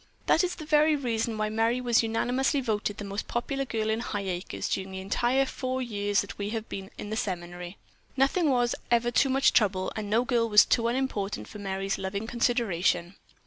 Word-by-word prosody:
"That's 360 Hz, +2 st, +2 dB
the 310 Hz, -, -8 dB
very 305 Hz, 0 st, +4 dB
reason 230 Hz, -4 st, -1 dB
why 215 Hz, 0 st, 0 dB
Merry 225 Hz, +3 st, +1 dB
was 240 Hz, -2 st, +3 dB
unanimously 250 Hz, +5 st, +1 dB
voted 215 Hz, -4 st, -1 dB
the 205 Hz, -, -6 dB
most 200 Hz, +1 st, -4 dB
popular 275 Hz, +3 st, -2 dB
girl 220 Hz, -3 st, -2 dB
in 220 Hz, -, 0 dB
Highacres 195 Hz, -5 st, -3 dB
during 190 Hz, 0 st, -2 dB
the 190 Hz, -, -5 dB
entire 240 Hz, +7 st, +1 dB
four 260 Hz, -1 st, -3 dB
years 205 Hz, -4 st, 0 dB
that 200 Hz, -, -9 dB
we 200 Hz, 0 st, -2 dB
have 225 Hz, 0 st, -4 dB
been 195 Hz, 0 st, -6 dB
at 205 Hz, -, -6 dB
the -, -, -1 dB
seminary. 175 Hz, -2 st, -4 dB, 0.4 s
Nothing 290 Hz, +5 st, +3 dB
was 245 Hz, -2 st, +2 dB, 0.2 s
ever 240 Hz, 0 st, +2 dB
too 270 Hz, +3 st, +3 dB
much 270 Hz, +1 st, +3 dB
trouble, 195 Hz, -4 st, +2 dB
and 210 Hz, -2 st, -4 dB
no 230 Hz, +4 st, +2 dB
girl 235 Hz, -2 st, +1 dB
was 210 Hz, -1 st, +8 dB
too 230 Hz, -1 st, +2 dB
unimportant 235 Hz, -5 st, -2 dB
for 210 Hz, -, -10 dB
Merry's 195 Hz, 0 st, -2 dB
loving 200 Hz, +3 st, -3 dB
consideration." 200 Hz, -7 st, 0 dB
225 Hz, 190 wpm, -28 LUFS, 200-250 Hz, 0.4 s, was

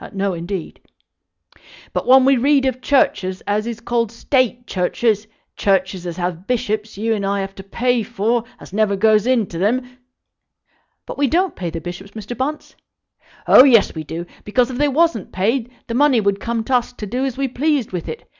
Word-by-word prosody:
"No, 195 Hz, -1 st, -1 dB
indeed." 175 Hz, +1 st, -5 dB, 1.1 s
"But -, -, -2 dB
when 260 Hz, 0 st, +7 dB
we 275 Hz, 0 st, +5 dB
read 275 Hz, +2 st, +3 dB
of 255 Hz, -1 st, -1 dB
Churches 190 Hz, -9 st, +1 dB
as 210 Hz, +2 st, -1 dB
is 230 Hz, -1 st, -5 dB
called 230 Hz, -1 st, -1 dB
State 245 Hz, 0 st, 0 dB
Churches, 210 Hz, +3 st, 0 dB, 0.3 s
Churches 190 Hz, -2 st, 0 dB
as 170 Hz, 0 st, -5 dB
have 175 Hz, 0 st, -4 dB
bishops 220 Hz, -4 st, -2 dB
you 225 Hz, +2 st, 0 dB
and 205 Hz, -2 st, -2 dB
I 200 Hz, 0 st, 0 dB
have 195 Hz, 0 st, -5 dB
to 195 Hz, -, -10 dB
pay 245 Hz, +4 st, 0 dB
for, 230 Hz, +1 st, -1 dB, 0.2 s
as -, -, -13 dB
never 210 Hz, -1 st, +2 dB
goes 215 Hz, +2 st, +3 dB
into 225 Hz, -10 st, 0 dB
them 250 Hz, +5 st, -1 dB, 0.5 s
" -, -, -46 dB
"But -, -, -8 dB
we 285 Hz, -, +3 dB
don't 360 Hz, +7 st, +1 dB
pay 175 Hz, -2 st, -4 dB
the 165 Hz, -, -5 dB
bishops, 180 Hz, +4 st, -8 dB
Mr. 220 Hz, +2 st, -7 dB
Bunce." 285 Hz, +6 st, -4 dB, 0.7 s
"Oh -, -, +9 dB
yes, 235 Hz, -7 st, +5 dB
we 160 Hz, -, -5 dB
do; 165 Hz, +3 st, -6 dB, 0.2 s
because, 245 Hz, +4 st, +1 dB
if 250 Hz, -, -5 dB
they 295 Hz, -, +3 dB
wasn't 290 Hz, -, +1 dB
paid, 225 Hz, +6 st, 0 dB, 0.2 s
the 230 Hz, -, -5 dB
money 275 Hz, -1 st, +4 dB
would 200 Hz, -1 st, 0 dB
come 230 Hz, +1 st, -2 dB
to 255 Hz, +2 st, +2 dB
us 245 Hz, 0 st, -4 dB
to 220 Hz, -, -7 dB
do 245 Hz, +6 st, -2 dB
as 265 Hz, -2 st, -2 dB
we 275 Hz, 0 st, 0 dB
pleased 275 Hz, 0 st, 0 dB
with 180 Hz, -2 st, -4 dB
it. 465 Hz, -, -7 dB
225 Hz, 195 wpm, -19 LUFS, 195-255 Hz, 1.1 s, Oh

